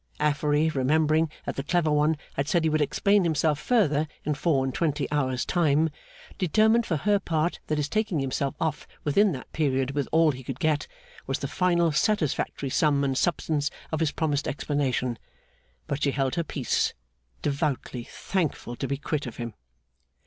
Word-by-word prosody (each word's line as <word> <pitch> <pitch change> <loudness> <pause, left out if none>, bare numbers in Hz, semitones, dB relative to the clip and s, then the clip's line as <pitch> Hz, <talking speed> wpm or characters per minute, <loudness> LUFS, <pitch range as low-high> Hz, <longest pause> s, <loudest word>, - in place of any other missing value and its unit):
Affery, 150 +1 +2
remembering 155 +3 +2 0.2
that - - -4
the - - 0
clever 160 +1 +1
one 150 +1 +3 0.2
had 140 +1 -2
said 175 -1 +2
he 160 - +2
would 155 0 +2
explain 200 +7 +3
himself 155 -3 +1
further 155 - +2 0.2
in 150 - +1
four 145 -3 +1
and 130 - -2
twenty 150 -3 0
hours' 130 -4 0
time, 160 -2 +2 0.5
determined 220 +6 +3
for 165 - +1
her 205 +7 +2
part 165 -2 -1
that 155 - 0
his 150 -1 0
taking 215 -1 0
himself 135 +1 -1
off 160 -3 -2 0.2
within 200 +8 +3
that 130 - -9
period 135 -3 +1
with 140 -1 -1
all 160 -1 +5
he 130 -1 -8
could 130 +1 -6
get, 155 -3 +1 0.4
was - - 0
the - - -4
final 170 -2 +2
satisfactory 150 -5 0
sum 145 -1 +3
and 135 -1 0
substance 150 -2 0 0.2
of 160 - -1
his 160 -3 +1
promised 150 -2 -1
explanation; 135 -4 -1 0.7
but 140 0 -3
she 140 - +3
held 135 -1 0
her 170 - 0
peace, 135 -6 -1 0.5
devoutly 140 -4 -1
thankful 155 -6 -3
to 135 - -3
be 140 - -1
quit 150 -1 -3
of 120 - -8
him. 120 -2 -5
150 Hz, 175 wpm, -26 LUFS, 140-165 Hz, 0.7 s, all